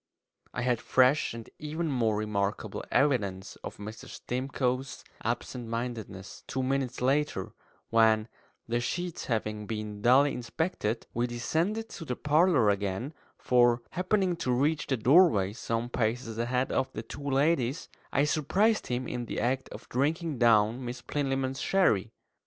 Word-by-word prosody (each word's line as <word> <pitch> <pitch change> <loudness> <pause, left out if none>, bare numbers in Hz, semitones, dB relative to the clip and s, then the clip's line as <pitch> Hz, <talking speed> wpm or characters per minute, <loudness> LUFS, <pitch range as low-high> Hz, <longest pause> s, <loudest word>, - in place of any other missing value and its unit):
I 120 - -3
had 120 -2 +1
fresh 130 +3 +3
and 115 -1 -8
even 155 +2 -3
more 115 -5 +1
remarkable 105 -1 -2
evidence 100 -9 +1
of - - -8
Mr. 105 +2 -8
Stimcoe's 130 0 -2 0.2
absent 120 +1 -3
mindedness 115 -5 -5
two 130 - -2
minutes 130 -2 -1
later, 145 +4 0 0.4
when, 110 -1 +4 0.4
the 120 +1 0
sheets 175 +7 -3
having 105 -3 -2
been 105 -1 -5
duly 135 +5 +5
inspected, 125 - -2
we 120 +1 0
descended 165 - -1
to 165 - -8
the 125 - -2
parlour 150 - +4
again; 100 +8 -2 0.2
for, 120 -1 +3
happening 185 0 +1
to 130 - -1
reach 145 +5 +1
the 130 - +1
doorway 120 - +5
some 115 0 -2
paces 115 -1 -2
ahead 125 +2 0
of 130 - 0
the 110 - -5
two 115 - -9
ladies, 140 +1 +1 0.2
I 140 - +3
surprised 190 +9 +2
him 125 +1 -2
in 120 -1 -3
the - - -4
act 130 +2 0
of - - -10
drinking 150 +2 -1
down 115 +1 +4
Miss 120 0 -6
Plinlimmon's 135 -2 -1
sherry. 115 - +2
125 Hz, 145 wpm, -29 LUFS, 115-145 Hz, 0.4 s, duly